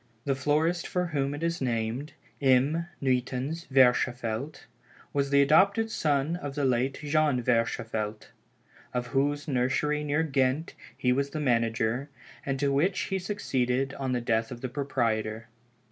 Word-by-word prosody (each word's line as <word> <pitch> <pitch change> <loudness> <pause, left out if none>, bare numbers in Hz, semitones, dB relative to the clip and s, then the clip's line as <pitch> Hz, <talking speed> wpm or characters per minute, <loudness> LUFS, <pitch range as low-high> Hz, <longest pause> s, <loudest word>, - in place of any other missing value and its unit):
The 140 - +2
florist 155 +5 +1
for 180 0 -1
whom 140 0 0
it 150 - -6
was 170 -2 -1
named, 120 +3 -2 0.3
M. 140 +5 +3 0.2
Nuytans 130 +5 -1
Verschaffelt, 125 0 +2 0.5
was 140 -1 +1
the 140 0 +5
adopted 200 +10 +4
son 150 0 0
of 145 -5 -6
the 145 -2 0
late 130 +1 +1
Jean 150 -3 +2
Verschaffelt, 110 -3 -1 0.7
of 125 0 0
whose 145 +2 +1
nursery 145 +3 0
near 150 +2 +1
Ghent, 135 +1 0 0.2
he 130 -2 +1
was 140 +2 0
the 155 - -4
manager, 115 0 0 0.3
and 135 -1 -2
to 140 0 +1
which 180 +8 +2
he 190 - +1
succeeded 135 - -1
on 135 -2 -3
the 125 - 0
death 115 -1 0
of 120 -2 -8
the 130 - -3
proprietor. 115 -5 -2
135 Hz, 145 wpm, -28 LUFS, 125-150 Hz, 0.7 s, the